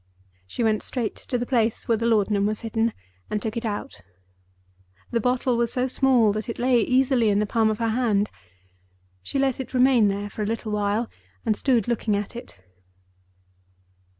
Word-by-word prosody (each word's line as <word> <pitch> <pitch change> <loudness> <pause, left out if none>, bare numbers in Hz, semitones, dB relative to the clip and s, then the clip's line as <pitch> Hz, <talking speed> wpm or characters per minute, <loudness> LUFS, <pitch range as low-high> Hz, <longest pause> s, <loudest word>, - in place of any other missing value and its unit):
She 235 - -3
went 215 -1 +2
straight 240 -4 -3
to 250 - -3
the 240 - -2
place 230 -3 0
where 230 - +3
the 230 +1 -1
laudanum 205 -2 +2
was 215 0 -3
hidden, 225 0 0 0.4
and 210 - -1
took 220 +2 -4
it 235 0 -3
out. 205 - -4 1.1
The 235 - +1
bottle 250 +1 +1
was 235 -1 +1
so 255 0 0
small 255 -4 +3
that 215 +3 -4
it 230 - -4
lay 245 0 +3
easily 255 -2 +2
in 200 - +2
the 210 - +2
palm 220 +1 +2
of 215 - -1
her 230 0 0
hand. 220 -3 +1 0.9
She 95 - -4
let 270 -2 +1
it 260 0 -6
remain 250 -4 +5
there 200 +1 -2
for 215 - -6
a 210 - -1
little 225 0 -3
while, 210 +2 0 0.4
and 215 - +2
stood 240 -3 +1
looking 230 -3 0
at 205 +3 -4
it. 240 - -10
230 Hz, 185 wpm, -24 LUFS, 210-245 Hz, 1.1 s, remain